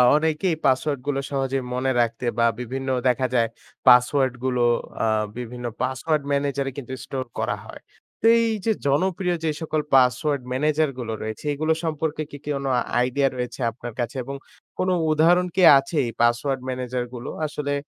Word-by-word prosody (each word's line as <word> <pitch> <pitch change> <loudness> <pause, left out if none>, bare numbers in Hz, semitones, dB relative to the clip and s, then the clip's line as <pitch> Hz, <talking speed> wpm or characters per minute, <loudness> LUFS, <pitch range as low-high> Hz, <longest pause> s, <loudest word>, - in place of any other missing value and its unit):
অনেকেই 160 +3 +1
পাসওয়ার্ডগুলো 135 +1 +1
সহজেই 135 -1 -1
মনে 130 +1 0
রাখতে 115 +1 -2
বা 115 - +5
বিভিন্ন 130 +2 -4 0.2
দেখা 125 +1 +2
যায়, 115 -2 +3 0.4
পাসওয়ার্ডগুলো 125 0 +4 0.4
আ - - +3 0.3
বিভিন্ন 125 0 -6 0.2
পাসওয়ার্ড 140 +4 0
ম্যানেজারে 140 -1 0
কিন্তু 130 -1 -6
স্টোর 130 -1 -4
করা - - 0
হয়। - - -11 0.4
তো - - -2
এই 230 -1 +2
যে, 225 - +3 0.2
জনপ্রিয় 180 +5 +1
যে 160 - +2
সকল 155 -1 -1
পাসওয়ার্ড 135 +3 +3
ম্যানেজারগুলো 135 -3 0
রয়েছে, 110 +4 -6
এইগুলো 155 +3 +1
সম্পর্কে 155 -1 -2
কি 145 - -7
কোনো 140 -2 -2 0.3
আইডিয়া 135 +3 +2
রয়েছে 125 +1 -4
আপনার 120 0 -8
কাছে? 120 +4 -2
এবং 140 +2 -6 0.4
কোন 185 - +1 0.2
উদাহরণ 175 +4 +4
কি 190 - +2 0.2
আছে, 135 +5 -2
এই 115 - -3
পাসওয়ার্ড 125 +3 +2
ম্যানেজারগুলো? 125 -1 -4 0.2
আসলে 145 -1 -3
135 Hz, 150 wpm, -23 LUFS, 125-150 Hz, 0.4 s, বা